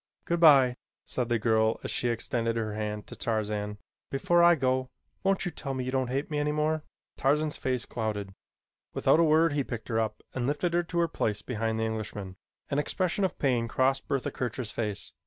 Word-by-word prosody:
"Good 170 0 0
bye," 135 -6 +7 0.3
said 125 -2 -2
the 120 - +3
girl 110 0 +2
as - - -3
she 120 - 0
extended 115 0 -1
her 110 -2 -2
hand 105 -1 -3
to - - -10
Tarzan. 105 -2 -2 0.3
"Before 170 +5 +2
I 170 0 +7
go 130 -2 0 0.3
won't 195 0 +1
you 175 - -1
tell 135 -3 -5
me 130 - -2
you 130 - -3
don't 130 -1 0
hate 135 +4 -2
me 150 - 0
any 150 0 +1
more?" 155 +1 0 0.4
Tarzan's 150 +2 +1
face 130 -2 -2
clouded. 105 -4 -3 0.6
Without - - +4
a - - +6
word 160 0 +4
he 145 -1 +1
picked 115 -3 -6
her 115 -1 +1
up 110 -1 -2
and 125 -1 -1
lifted 160 +4 0
her 175 - +3
to 175 0 -5
her 170 0 +3
place 105 -9 -2
behind 110 -2 -2
the 110 - +1
Englishman. 105 -4 -4 0.4
An 140 - +2
expression 185 +5 0
of 190 - 0
pain 125 -4 +1
crossed 135 +3 +1
Bertha 135 -2 -1
Kircher's 120 -2 -3
face. 105 -3 -3
130 Hz, 205 wpm, -29 LUFS, 110-150 Hz, 0.6 s, bye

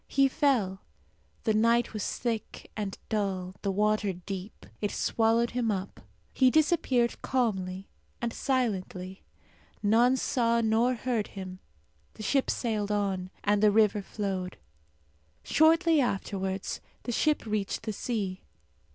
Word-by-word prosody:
He 275 0 +4
fell. 255 -10 +1 0.6
The 220 - +2
night 230 +2 +3
was 215 -3 -3
thick 230 -3 -4
and 205 -3 -4
dull, 190 -4 -2
the 200 - -1
water 210 0 +1
deep. 185 +3 -7 0.2
It 205 - 0
swallowed 230 +2 +1
him 240 -2 0
up. 195 -2 -3 0.3
He 260 -1 +5
disappeared 280 -5 +2
calmly 195 -7 -1 0.3
and 235 -1 -2
silently. 190 -8 -2 0.6
None 235 +5 +4
saw 235 -2 +1
nor 230 +3 +2
heard 235 -3 -1
him. 185 -1 -6 0.6
The 215 - -8
ship 270 +5 +1
sailed 215 -4 -1
on, 195 -3 -1
and 205 0 +2
the 215 - +6
river 210 -1 +3
flowed. 190 -3 -4 0.9
Shortly 325 +1 +4
afterwards 195 -4 -2 0.2
the 240 - -3
ship 300 +4 +1
reached 210 -2 -2
the 220 - -3
sea. 200 -4 -3
215 Hz, 125 wpm, -29 LUFS, 195-240 Hz, 0.9 s, the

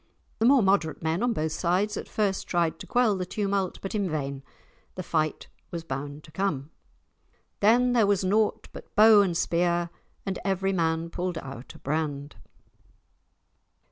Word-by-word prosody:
The 225 - +4
more 265 -3 +6
moderate 190 -6 +1
men 160 +4 0
on 245 0 +2
both 160 -7 -1
sides 190 +6 0
at - - -6
first 200 -3 -1
tried 170 -2 0
to - - -9
quell 240 -4 +3
the 185 - -2
tumult, 195 0 -1
but 195 - -4
in 200 -4 0
vain. 140 -3 -3 0.5
The 185 - -5
fight 155 -3 -1 0.2
was 170 -1 -5
bound 145 0 -6
to 155 - -15
come. 160 -6 -2 0.9
"Then 245 +4 +4
there 225 -4 +4
was 200 -2 +2
naught 210 +3 +1
but - - -12
bow 215 0 +8
and 180 -4 0
spear, 170 0 +1 0.3
And 190 -2 -3
every 195 0 0
man 165 -1 0
pulled 180 -1 -3
out 135 -4 -8
a - - -11
brand." 145 -1 -3
180 Hz, 165 wpm, -27 LUFS, 160-200 Hz, 0.9 s, bow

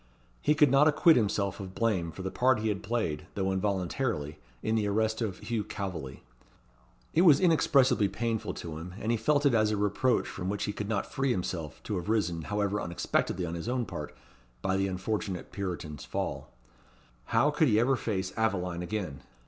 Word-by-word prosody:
He 150 - +3
could 150 -3 +5
not 140 +2 +6
acquit 155 +2 +6
himself 100 -4 0
of 95 -1 -7
blame 95 -8 0
for 95 - -8
the 95 - -3
part 130 0 +3
he 110 0 -1
had 100 -2 -2
played, 95 -7 -2
though 95 -1 0
involuntarily, 95 - -1 0.2
in 110 - 0
the 110 -2 +1
arrest 110 +2 0
of 100 -5 -2
Hugh 110 0 -2
Calveley. 95 -10 -6 0.9
It 170 - +4
was 155 -6 +7
inexpressibly 140 - +4
painful 110 0 -2
to 80 -2 -6
him; 90 +2 -8
and 110 - -1
he - - +3
felt 145 +5 +2
it 140 - +5
as 110 -2 +3
a 105 - 0
reproach 105 +5 +1
from 90 0 -4
which 100 +1 -2
he 105 - -2
could 105 0 -5
not 105 -3 -2
free 135 0 0
himself, 90 -7 -3
to 105 - -2
have 90 +3 -4
risen, 90 -7 +1
however 105 0 0
unexpectedly 85 +1 -1
on 85 - -4
his 85 +7 -4
own 125 -1 0
part, - - -7 0.5
by 95 0 +1
the 95 0 +1
unfortunate 95 0 -3
Puritan's 90 -7 -5
fall. - - -4 0.7
How 150 - +3
could 150 +1 +3
he 110 -3 +4
ever 130 +4 +3
face 95 -6 -2
Aveline 90 -6 0
again! 90 -7 -4
105 Hz, 190 wpm, -29 LUFS, 90-115 Hz, 0.9 s, was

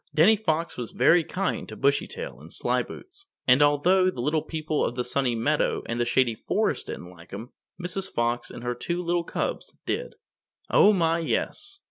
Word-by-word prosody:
Danny 180 +8 +6
Fox 165 -6 -1
was 120 -2 -5
very 165 +7 +5
kind 195 +5 -2
to - - -7
Bushytail 465 - -1
and - - -12
Slyboots, 390 +2 -3 0.2
and 130 +2 +6
although 175 +6 +4
the 185 - -6
Little 150 +5 +1
People 155 -1 -2
of 120 - -1
the 125 - -1
Sunny 125 -1 0
Meadow 145 +7 +1
and 115 +1 -3
the 120 - +2
Shady 120 -1 +3
Forest - - -1
didn't 90 - -7
like 85 0 -15
him, 110 +6 -8 0.3
Mrs. 185 +2 -4
Fox 120 +1 -1
and 120 - -9
her 120 0 -1
two 170 +8 -3
little 175 0 0
cubs - - -4
did. - - -3 0.6
Oh 205 - +7
my, 165 -4 +2
yes! 395 - -3
155 Hz, 180 wpm, -26 LUFS, 120-180 Hz, 0.6 s, Oh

